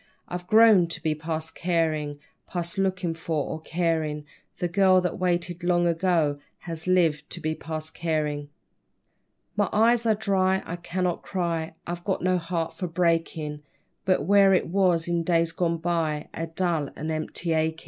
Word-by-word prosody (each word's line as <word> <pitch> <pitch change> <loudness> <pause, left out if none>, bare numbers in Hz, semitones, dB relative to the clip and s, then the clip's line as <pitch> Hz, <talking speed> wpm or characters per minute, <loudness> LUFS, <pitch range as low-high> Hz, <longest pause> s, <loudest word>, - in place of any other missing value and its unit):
I've 180 0 -6
grown 215 -5 +6
to 165 - -6
be 155 - +2
past 160 +1 -4
carin' 160 -4 0 0.3
Past 175 +2 -3
lookin' 185 -3 0
for 160 -3 -2
or 160 - -5
carin'; 160 -3 -1 0.3
The 175 - -1
girl 185 +1 +4
that 180 +1 -2
waited 175 -1 -1
long 175 0 +2
ago, 165 -4 +1 0.2
Has 165 -1 -6
lived 165 -5 +2
to - - -4
be 155 -1 -1
past 160 0 -6
carin'. 150 -3 -2 1.1
My - - +1
eyes 230 +2 +3
are 220 - +4
dry, 190 -2 +1
I 175 - -5
cannot 180 0 -2
cry, 165 -4 -2
I've 175 0 -5
got 190 -2 -1
no 185 0 +2
heart 165 -1 -3
for 180 - -4
breakin', 165 -3 0 0.4
But 185 -4 +2
where 195 0 +6
it 180 - 0
was 180 -3 +2
in 170 -1 +1
days 165 -1 +2
gone 170 0 0
by, 160 -3 -1
A 165 - -4
dull 165 -3 0
and 155 +1 -4
empty 160 +2 -2
achin'. 160 0 +1
170 Hz, 165 wpm, -26 LUFS, 160-180 Hz, 1.1 s, grown